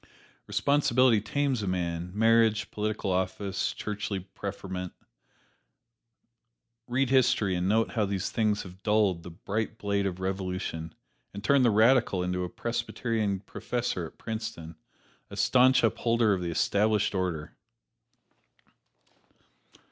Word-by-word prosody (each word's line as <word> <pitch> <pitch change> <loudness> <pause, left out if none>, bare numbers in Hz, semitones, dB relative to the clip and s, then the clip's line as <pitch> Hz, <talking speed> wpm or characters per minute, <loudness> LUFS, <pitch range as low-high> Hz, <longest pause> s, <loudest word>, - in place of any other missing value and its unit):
Responsibility 130 -5 +3
tames 130 +3 0
a 100 - -3
man 85 -1 -2
marriage, 110 -1 +3
political 105 -2 -2
office, 95 +1 -1
churchly 105 -1 -4
preferment 95 -1 -6 1.9
read 130 +1 0
history 115 -7 +3
and 90 +1 0
note 110 +2 +2
how 110 -3 +1
these 100 -2 -2
things 105 -2 +1
have 95 0 -12
dulled 105 -5 +2
the 90 - -9
bright 105 +6 -4
blade 100 -1 0
of 90 -1 -4
revolution 90 -4 -4 0.4
and 100 - -7
turned 140 +4 +4
the 120 - +5
radical 110 -3 +4
into 90 0 -1
a 90 - -4
Presbyterian 115 -3 -2
professor 110 -4 -3
at - - -18
Princeton, 110 -7 -6 0.5
a 100 - -9
staunch 125 +6 +4
upholder 115 -1 +2
of 95 - -2
the 85 - -2
Established 105 +5 +1
Order! 90 -5 -3
105 Hz, 120 wpm, -28 LUFS, 95-115 Hz, 1.9 s, the